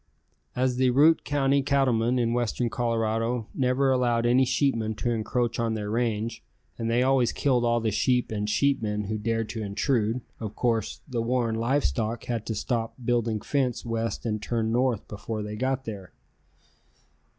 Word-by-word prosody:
As 125 Hz, 0 st, +1 dB
the 130 Hz, 0 st, +3 dB
Routt 150 Hz, +6 st, +5 dB
County 140 Hz, -1 st, +2 dB
cattlemen 130 Hz, -3 st, +2 dB
in 120 Hz, -1 st, +1 dB
western 120 Hz, 0 st, -1 dB
Colorado 115 Hz, 0 st, 0 dB
never 130 Hz, +1 st, +2 dB
allowed 120 Hz, -2 st, +2 dB
any 125 Hz, +2 st, +4 dB
sheepmen 120 Hz, -4 st, 0 dB
to 120 Hz, +3 st, -1 dB
encroach 115 Hz, +1 st, -1 dB
on 115 Hz, -1 st, 0 dB
their 105 Hz, -1 st, -4 dB
range, 115 Hz, -1 st, -1 dB, 0.3 s
and 115 Hz, 0 st, -3 dB
they 120 Hz, +2 st, +3 dB
always 130 Hz, -2 st, +3 dB
killed 125 Hz, -4 st, +1 dB
all 120 Hz, 0 st, +2 dB
the 110 Hz, -1 st, 0 dB
sheep 125 Hz, +3 st, +1 dB
and 105 Hz, -1 st, -2 dB
sheepmen 105 Hz, -5 st, 0 dB
who 110 Hz, 0 st, -2 dB
dared 115 Hz, +1 st, -1 dB
to 115 Hz, -, -4 dB
intrude, 110 Hz, +3 st, 0 dB, 0.2 s
of 110 Hz, -2 st, -6 dB
course, 115 Hz, -4 st, -1 dB
the 120 Hz, -4 st, -2 dB
Warren 120 Hz, -1 st, 0 dB
Live 120 Hz, +6 st, +1 dB
Stock 115 Hz, 0 st, -1 dB
had 115 Hz, -3 st, -3 dB
to 110 Hz, -, -2 dB
stop 115 Hz, +1 st, -2 dB
building 115 Hz, -3 st, +1 dB
fence 130 Hz, -5 st, -1 dB
west 115 Hz, +1 st, -2 dB
and 105 Hz, -2 st, -1 dB
turn 115 Hz, -1 st, -1 dB
north 125 Hz, -2 st, +1 dB
before 105 Hz, +1 st, -5 dB
they 105 Hz, 0 st, -5 dB
got 130 Hz, +3 st, -1 dB
there. 100 Hz, -5 st, -7 dB
115 Hz, 170 wpm, -26 LUFS, 110-125 Hz, 0.3 s, Routt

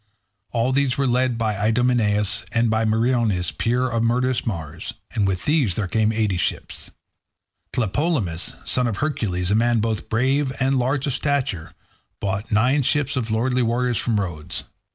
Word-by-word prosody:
All 120 Hz, +2 st, +1 dB
these 135 Hz, -1 st, +1 dB
were 140 Hz, -, +1 dB
led 125 Hz, -1 st, +1 dB
by 110 Hz, -2 st, 0 dB
Idomeneus, 105 Hz, -1 st, +1 dB
and 115 Hz, -1 st, +2 dB
by 110 Hz, 0 st, +2 dB
Meriones, 110 Hz, -4 st, +1 dB
peer 125 Hz, +2 st, 0 dB
of 115 Hz, -2 st, -1 dB
murderous 125 Hz, +1 st, +1 dB
Mars. 80 Hz, -6 st, -5 dB, 0.2 s
And 105 Hz, -3 st, +1 dB
with 95 Hz, -1 st, -2 dB
these 145 Hz, -, +2 dB
there 105 Hz, -3 st, -1 dB
came 110 Hz, +3 st, +2 dB
eighty 110 Hz, -4 st, 0 dB
ships. 85 Hz, -, -3 dB, 0.8 s
Tlepolemus, 115 Hz, -, -1 dB
son 125 Hz, -1 st, +1 dB
of 110 Hz, -, -2 dB
Hercules, 100 Hz, -12 st, -1 dB
a -, -, +4 dB
man 120 Hz, +1 st, +3 dB
both 110 Hz, 0 st, -2 dB
brave 130 Hz, +4 st, +1 dB
and 135 Hz, +1 st, +2 dB
large 130 Hz, +3 st, 0 dB
of 140 Hz, -, -1 dB
stature, 130 Hz, -, -1 dB, 0.5 s
brought 100 Hz, +4 st, -3 dB
nine 125 Hz, +7 st, +3 dB
ships 145 Hz, +2 st, 0 dB
of 120 Hz, -4 st, -2 dB
lordly 125 Hz, +4 st, +1 dB
warriors 120 Hz, 0 st, +1 dB
from 115 Hz, -3 st, 0 dB
Rhodes. 85 Hz, -6 st, -4 dB
115 Hz, 160 wpm, -22 LUFS, 105-130 Hz, 0.8 s, a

